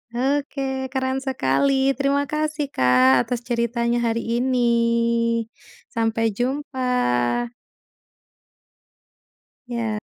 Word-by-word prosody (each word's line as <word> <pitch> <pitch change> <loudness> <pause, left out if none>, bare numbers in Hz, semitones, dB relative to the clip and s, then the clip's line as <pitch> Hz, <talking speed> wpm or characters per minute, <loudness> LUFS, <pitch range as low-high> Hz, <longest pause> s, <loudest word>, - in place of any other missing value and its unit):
Oke. 270 0 -1
Keren 260 0 -1
sekali. 265 - +1
Terima 280 +1 +1
kasih 305 -1 -2
Kak 125 0 +4
atas 245 -1 -3
ceritanya 235 0 0
hari 230 +1 -1
ini. 250 -1 +1 1.3
Sampai 225 0 0
jumpa. 250 - 0 2.2
Ya. 230 -3 -2
250 Hz, 75 wpm, -22 LUFS, 230-270 Hz, 2.2 s, Kak